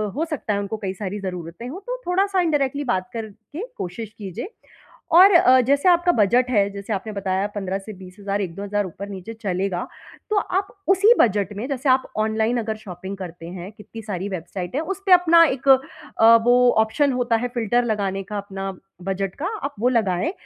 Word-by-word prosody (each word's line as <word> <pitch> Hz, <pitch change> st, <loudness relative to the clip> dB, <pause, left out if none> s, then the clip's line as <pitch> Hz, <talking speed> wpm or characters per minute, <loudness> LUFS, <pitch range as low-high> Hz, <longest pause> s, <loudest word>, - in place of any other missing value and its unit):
हो 315 Hz, +4 st, 0 dB
सकता 280 Hz, -9 st, -2 dB
है, 200 Hz, -, 0 dB
उनको 200 Hz, +2 st, -4 dB
कई 190 Hz, -1 st, -2 dB
सारी 200 Hz, +1 st, -5 dB
ज़रूरतें 180 Hz, +3 st, -6 dB
हो, 330 Hz, +8 st, -7 dB
तो -, -, -4 dB
थोड़ा-सा 380 Hz, +1 st, +2 dB
इंडायरेक्टली 290 Hz, -4 st, 0 dB
बात 185 Hz, 0 st, -3 dB
करके 225 Hz, -, -7 dB
कोशिश 210 Hz, +4 st, -6 dB
कीजिए। 205 Hz, -, -7 dB, 0.6 s
और 380 Hz, +3 st, +9 dB
अ, 260 Hz, -7 st, +6 dB
जैसे 280 Hz, +7 st, +2 dB
आपका 350 Hz, 0 st, +4 dB
बजट 240 Hz, +4 st, +3 dB
है, 200 Hz, -4 st, +3 dB
जैसे 200 Hz, +2 st, -5 dB
आपने 210 Hz, +2 st, -4 dB
बताया 195 Hz, 0 st, -1 dB
15 195 Hz, -1 st, -2 dB
से 215 Hz, +2 st, -9 dB
20 185 Hz, -1 st, -13 dB
हज़ार, 200 Hz, 0 st, -2 dB
1-2 190 Hz, +1 st, -5 dB
हज़ार 205 Hz, 0 st, -1 dB
ऊपर-नीचे 200 Hz, +3 st, -8 dB
चलेगा, 185 Hz, -2 st, -2 dB, 0.4 s
तो 425 Hz, -, +1 dB
आप 390 Hz, 0 st, 0 dB, 0.2 s
उसी 400 Hz, +4 st, +6 dB
बजट 205 Hz, -3 st, +2 dB
में 230 Hz, +5 st, -4 dB
जैसे 275 Hz, 0 st, -1 dB
आप 260 Hz, 0 st, +4 dB, 0.2 s
ऑनलाइन 220 Hz, +2 st, +1 dB
अगर 220 Hz, -1 st, -3 dB
शॉपिंग 190 Hz, -1 st, -8 dB
करते 175 Hz, -3 st, -8 dB
हैं, 180 Hz, +2 st, -8 dB
कितनी 225 Hz, +1 st, -11 dB
सारी 200 Hz, -2 st, -4 dB
वेबसाइट 180 Hz, +1 st, -5 dB
है, 295 Hz, -, +1 dB
उसपे 390 Hz, +3 st, -3 dB
अपना 340 Hz, -2 st, +7 dB
एक 275 Hz, -2 st, -1 dB, 0.5 s
अ, 225 Hz, +1 st, +8 dB
वो 245 Hz, 0 st, +5 dB
ऑप्शन 270 Hz, +6 st, +1 dB
होता 245 Hz, -2 st, +1 dB
है 245 Hz, -, +1 dB
फिल्टर 240 Hz, +1 st, +1 dB
लगाने 195 Hz, -3 st, -1 dB
का, 205 Hz, +2 st, -6 dB
अपना 195 Hz, -1 st, -5 dB, 0.3 s
बजट 195 Hz, 0 st, -3 dB
का, 300 Hz, -, -5 dB, 0.2 s
आप 280 Hz, +1 st, -4 dB
वो 245 Hz, +3 st, +3 dB
लगाएँ 220 Hz, -, +1 dB
215 Hz, 190 wpm, -22 LUFS, 195-270 Hz, 0.6 s, और